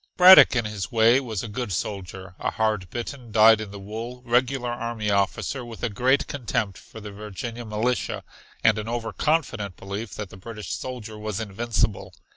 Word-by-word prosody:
Braddock 185 Hz, -6 st, +9 dB
in 120 Hz, -2 st, +1 dB
his 100 Hz, -4 st, -4 dB
way 115 Hz, +3 st, +5 dB
was 115 Hz, -7 st, -4 dB
a -, -, -4 dB
good 115 Hz, 0 st, -4 dB
soldier, 95 Hz, +1 st, -4 dB
a -, -, -1 dB
hard 105 Hz, -5 st, -1 dB
bitten, 120 Hz, 0 st, -6 dB
dyed 110 Hz, 0 st, +6 dB
in 110 Hz, -, -6 dB
the 100 Hz, -, -9 dB
wool, 115 Hz, +5 st, -7 dB
regular 125 Hz, +1 st, +1 dB
army 115 Hz, -3 st, -2 dB
officer 100 Hz, +6 st, 0 dB
with 115 Hz, -2 st, -10 dB
a 120 Hz, -, +1 dB
great 125 Hz, +7 st, +2 dB
contempt 110 Hz, -6 st, -2 dB
for 110 Hz, -, -12 dB
the 105 Hz, -1 st, -8 dB
Virginia 105 Hz, +4 st, -7 dB
militia, 110 Hz, +4 st, -1 dB, 0.4 s
and 110 Hz, 0 st, +4 dB
an 105 Hz, -, -5 dB
over 115 Hz, -2 st, -3 dB
confident 120 Hz, -, -1 dB
belief 100 Hz, -1 st, -6 dB
that 105 Hz, -2 st, -6 dB
the -, -, -11 dB
British 105 Hz, +2 st, -8 dB
soldier 115 Hz, -4 st, -6 dB
was 105 Hz, -1 st, -3 dB
invincible. 110 Hz, 0 st, -2 dB
110 Hz, 180 wpm, -25 LUFS, 105-120 Hz, 0.4 s, Braddock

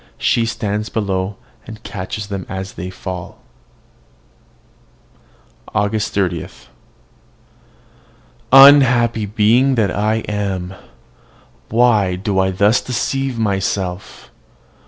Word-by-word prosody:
She 115 Hz, -1 st, +1 dB
stands 105 Hz, -1 st, -3 dB
below, 95 Hz, -2 st, -2 dB, 0.3 s
and 110 Hz, -1 st, -11 dB
catches 100 Hz, +1 st, -6 dB
them 100 Hz, -2 st, -6 dB
as 95 Hz, 0 st, -6 dB
they 90 Hz, +2 st, -7 dB
fall. 90 Hz, -1 st, -7 dB, 2.4 s
AUGUST 105 Hz, 0 st, 0 dB
30. 90 Hz, -5 st, -1 dB, 2.0 s
Unhappy 125 Hz, -5 st, +6 dB
being 115 Hz, +6 st, +2 dB
that 105 Hz, -5 st, 0 dB
I 110 Hz, +2 st, 0 dB
am! 95 Hz, -3 st, -3 dB, 1.0 s
Why 110 Hz, -5 st, +2 dB
do 95 Hz, +1 st, -2 dB
I 95 Hz, 0 st, +2 dB
thus 100 Hz, +4 st, +2 dB
deceive 130 Hz, +1 st, -2 dB
myself? 95 Hz, -3 st, -3 dB
105 Hz, 90 wpm, -18 LUFS, 95-115 Hz, 2.4 s, Unhappy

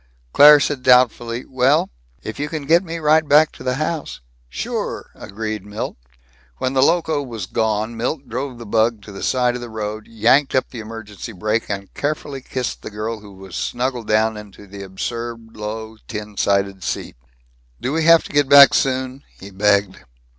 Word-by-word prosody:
Claire 150 Hz, +1 st, +9 dB
said 145 Hz, -2 st, -1 dB
doubtfully, 125 Hz, -2 st, +3 dB
"Well 130 Hz, -, +2 dB, 0.3 s
If 110 Hz, -, -7 dB
you 150 Hz, +1 st, -2 dB
can 155 Hz, -2 st, -5 dB
get 170 Hz, +5 st, +4 dB
me 170 Hz, -2 st, -5 dB
right 155 Hz, 0 st, +3 dB
back 150 Hz, +2 st, +6 dB
to -, -, -12 dB
the 125 Hz, 0 st, -1 dB
house 155 Hz, +2 st, -3 dB, 0.2 s
" -, -, -37 dB
"Sure," -, -, -4 dB
agreed 110 Hz, 0 st, -6 dB
Milt. 105 Hz, +1 st, -5 dB, 0.6 s
When 130 Hz, -, -2 dB
the 130 Hz, -, +3 dB
Loco 160 Hz, 0 st, +2 dB
was 115 Hz, -6 st, -6 dB
gone, 110 Hz, +1 st, -1 dB
Milt 130 Hz, +5 st, -3 dB
drove 130 Hz, +2 st, -4 dB
the 115 Hz, -, -9 dB
bug 110 Hz, 0 st, +1 dB
to 105 Hz, -, -11 dB
the 95 Hz, -, -9 dB
side 125 Hz, -2 st, +1 dB
of 125 Hz, -, -5 dB
the 120 Hz, -, -7 dB
road, 110 Hz, -1 st, -5 dB
yanked 115 Hz, +6 st, +2 dB
up 130 Hz, -, 0 dB
the 120 Hz, -, -7 dB
emergency 110 Hz, 0 st, -8 dB
brake, 110 Hz, +4 st, -2 dB
and 100 Hz, -1 st, -5 dB
carefully 145 Hz, -2 st, -3 dB
kissed 130 Hz, -1 st, -4 dB
the -, -, -7 dB
girl 110 Hz, +2 st, -4 dB
who 105 Hz, -1 st, -14 dB
was 95 Hz, -1 st, -11 dB
snuggled 125 Hz, -2 st, -2 dB
down 110 Hz, 0 st, +2 dB
into 105 Hz, -1 st, -12 dB
the 100 Hz, 0 st, -10 dB
absurd 115 Hz, +4 st, -6 dB
low 110 Hz, +1 st, -6 dB
tin 105 Hz, -1 st, -7 dB
sided 100 Hz, -2 st, 0 dB
seat. -, -, -4 dB, 0.6 s
"Do 130 Hz, -, -2 dB
we 160 Hz, 0 st, +1 dB
have 165 Hz, 0 st, +7 dB
to -, -, -11 dB
get 145 Hz, -2 st, +2 dB
back 140 Hz, -1 st, +9 dB
soon?" 130 Hz, 0 st, 0 dB, 0.2 s
he 100 Hz, +1 st, -11 dB
begged. 100 Hz, -1 st, +2 dB
115 Hz, 185 wpm, -20 LUFS, 105-135 Hz, 0.6 s, Claire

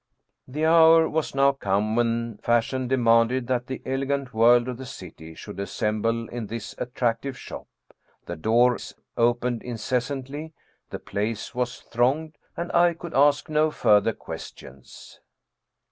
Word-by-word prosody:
The 150 Hz, +5 st, -2 dB
hour 165 Hz, 0 st, +6 dB
was 155 Hz, -3 st, -2 dB
now 140 Hz, 0 st, +5 dB
come 105 Hz, -4 st, -1 dB
when 115 Hz, -2 st, -1 dB
fashion 120 Hz, +2 st, 0 dB
demanded 120 Hz, 0 st, +3 dB
that 125 Hz, 0 st, -1 dB
the 130 Hz, -, -6 dB
elegant 135 Hz, 0 st, -2 dB
world 120 Hz, +2 st, +5 dB
of 125 Hz, -2 st, -4 dB
the 130 Hz, -, -7 dB
city 80 Hz, -5 st, -10 dB
should 95 Hz, -, -9 dB
as 100 Hz, -1 st, -4 dB
semble 115 Hz, +2 st, -1 dB
in 120 Hz, -3 st, -5 dB
this 115 Hz, 0 st, -6 dB
attractive 125 Hz, +1 st, -2 dB
shop. -, -, -9 dB, 0.6 s
The 85 Hz, -, -5 dB
doors 120 Hz, +8 st, +1 dB, 0.2 s
opened 120 Hz, 0 st, +1 dB
inces 125 Hz, +1 st, -2 dB
santly, 145 Hz, +3 st, -6 dB, 0.4 s
the -, -, -5 dB
place 105 Hz, +2 st, -4 dB
was 125 Hz, 0 st, -3 dB
thronged, 140 Hz, +7 st, -1 dB, 0.2 s
and 170 Hz, -, -4 dB
I 175 Hz, -1 st, +4 dB
could 170 Hz, 0 st, -9 dB
ask 145 Hz, +1 st, +3 dB
no 155 Hz, 0 st, +2 dB
further 105 Hz, -6 st, +3 dB
questions. -, -, -11 dB
125 Hz, 145 wpm, -25 LUFS, 115-140 Hz, 0.6 s, hour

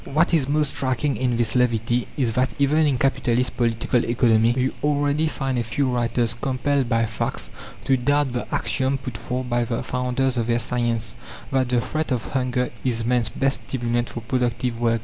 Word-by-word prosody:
What 155 Hz, +5 st, +1 dB
is 145 Hz, -5 st, +2 dB
most 150 Hz, -1 st, +2 dB
striking 135 Hz, +2 st, 0 dB
in 125 Hz, -2 st, 0 dB
this 115 Hz, -1 st, +1 dB
levity 120 Hz, -1 st, +1 dB
is 125 Hz, -5 st, +1 dB
that 130 Hz, +3 st, 0 dB
even 150 Hz, +2 st, +3 dB
in 135 Hz, -3 st, +1 dB
capitalist 125 Hz, -2 st, +1 dB
Political 115 Hz, 0 st, +1 dB
Economy 115 Hz, -1 st, +3 dB
you 130 Hz, +1 st, +1 dB
already 145 Hz, +1 st, +2 dB
find 135 Hz, -4 st, -2 dB
a -, -, 0 dB
few 115 Hz, +5 st, -1 dB
writers 120 Hz, -1 st, 0 dB
compelled 130 Hz, +1 st, 0 dB
by 115 Hz, 0 st, +2 dB
facts 110 Hz, 0 st, -3 dB, 0.3 s
to 135 Hz, -, +3 dB
doubt 140 Hz, +1 st, +1 dB
the 120 Hz, -, -4 dB
axiom 135 Hz, 0 st, 0 dB
put 125 Hz, -3 st, -7 dB
forth 125 Hz, +3 st, -4 dB
by 120 Hz, 0 st, +1 dB
the 115 Hz, 0 st, -2 dB
founders 125 Hz, 0 st, 0 dB
of 115 Hz, -, -1 dB
their 120 Hz, 0 st, +2 dB
science, 120 Hz, -2 st, -1 dB, 0.4 s
that 130 Hz, -2 st, +1 dB
the 125 Hz, -1 st, +2 dB
threat 155 Hz, +6 st, -3 dB
of 120 Hz, -4 st, -1 dB
hunger 125 Hz, -1 st, 0 dB
is 115 Hz, -3 st, -1 dB
man's 120 Hz, -1 st, +2 dB
best 135 Hz, 0 st, 0 dB
stimulant 120 Hz, -2 st, -1 dB
for 120 Hz, -, -6 dB
productive 120 Hz, 0 st, -1 dB
work. 115 Hz, -1 st, +2 dB
125 Hz, 190 wpm, -23 LUFS, 120-135 Hz, 0.4 s, even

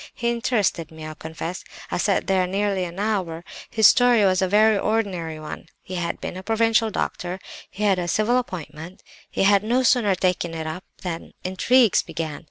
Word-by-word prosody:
He 235 Hz, -1 st, 0 dB
interested 225 Hz, -8 st, 0 dB
me, 160 Hz, -1 st, -10 dB
I 155 Hz, -, -6 dB
confess; 160 Hz, +3 st, -6 dB, 0.3 s
I -, -, -1 dB
sat 195 Hz, +1 st, +1 dB
there 190 Hz, -2 st, +2 dB
nearly 195 Hz, 0 st, 0 dB
an 175 Hz, +1 st, -8 dB
hour. 190 Hz, -6 st, -2 dB, 0.3 s
His 220 Hz, -2 st, +2 dB
story 240 Hz, -1 st, +6 dB
was 185 Hz, 0 st, +3 dB
a 190 Hz, -, +2 dB
very 215 Hz, +3 st, +4 dB
ordinary 195 Hz, -7 st, -1 dB
one. 155 Hz, +1 st, -8 dB, 0.2 s
He 185 Hz, -, -9 dB
had 170 Hz, -2 st, -3 dB
been -, -, -5 dB
a 185 Hz, -, -6 dB
provincial 225 Hz, +2 st, +2 dB
doctor; 180 Hz, -3 st, -3 dB, 0.3 s
he 210 Hz, -, -6 dB
had 195 Hz, -3 st, +3 dB
a 175 Hz, -, -2 dB
civil 215 Hz, +7 st, +2 dB
appointment, 175 Hz, -5 st, -8 dB, 0.3 s
and -, -, +2 dB
had 200 Hz, 0 st, +5 dB
no 245 Hz, +4 st, +1 dB
sooner 230 Hz, -6 st, +3 dB
taken 180 Hz, -2 st, -1 dB
it 160 Hz, -1 st, -4 dB
up 160 Hz, +4 st, -6 dB, 0.2 s
than 170 Hz, -3 st, -5 dB
intrigues 220 Hz, +5 st, +3 dB
began. 160 Hz, -3 st, -5 dB
190 Hz, 185 wpm, -23 LUFS, 170-220 Hz, 0.3 s, story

